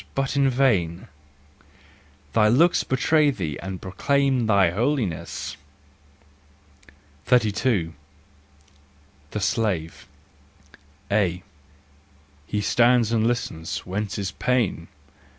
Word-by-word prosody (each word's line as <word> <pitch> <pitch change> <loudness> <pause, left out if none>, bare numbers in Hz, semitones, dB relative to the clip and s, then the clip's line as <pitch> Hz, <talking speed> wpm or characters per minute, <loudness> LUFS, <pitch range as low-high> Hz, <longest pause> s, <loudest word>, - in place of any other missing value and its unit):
But 135 0 -1
in 140 -1 +3
vain! 100 -10 0 1.2
Thy 110 -1 +4
looks 155 +11 +4
betray 150 +3 +2
thee 80 - -4
And 95 -1 -6
proclaim 130 +5 0
thy 100 -5 +4
holiness. 115 - -2 1.7
32. 110 -7 +1 1.4
The 105 - -4
Slave. 100 -6 -2 1.0
A. 90 -4 +1 1.0
He 105 - -2
stands 120 +1 +3
and 115 -1 +2
listens: 100 -9 -3
whence 100 0 -3
his 100 -2 -3
pain 115 -10 -1
110 Hz, 85 wpm, -24 LUFS, 95-125 Hz, 1.7 s, Thy